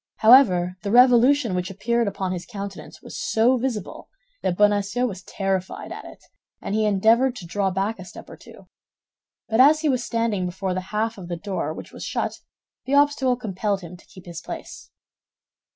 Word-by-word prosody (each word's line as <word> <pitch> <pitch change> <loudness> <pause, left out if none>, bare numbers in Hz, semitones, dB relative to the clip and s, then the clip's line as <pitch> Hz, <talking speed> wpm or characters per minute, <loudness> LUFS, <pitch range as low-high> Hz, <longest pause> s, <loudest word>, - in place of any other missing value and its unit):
However, 190 -7 +5
the 200 - -4
revolution 250 +1 +5
which 180 0 -2
appeared 230 +4 -1
upon 195 -2 -3
his 180 -1 -5
countenance 200 -1 -8
was - - -7
so 240 +4 +2
visible 235 -6 -4 0.3
that 175 - -1
Bonacieux 205 +3 +2
was 195 -6 -5
terrified 190 -1 -3
at - - -8
it, - - -13 0.4
and - - -5
he 215 0 +1
endeavored 225 +6 +3
to 185 - -9
draw 195 +3 -1
back 195 +3 -2
a 185 - -8
step - - -12
or - - -11
two; - - -16 0.8
but 220 +1 0
as 300 +4 +6
he 310 - +1
was 255 -2 0
standing 220 -5 -1
before 185 +1 -3
the 185 - -2
half 220 0 -2
of 180 - -9
the 175 -1 -4
door 180 -4 -3
which - - -9
was - - -9
shut, - - -3 0.5
the 270 +2 0
obstacle 285 -3 +3
compelled 205 -3 -2
him 175 0 -10
to 175 - -18
keep 185 - -15
his 170 -2 -8
place. - - -9
205 Hz, 185 wpm, -23 LUFS, 185-240 Hz, 0.8 s, as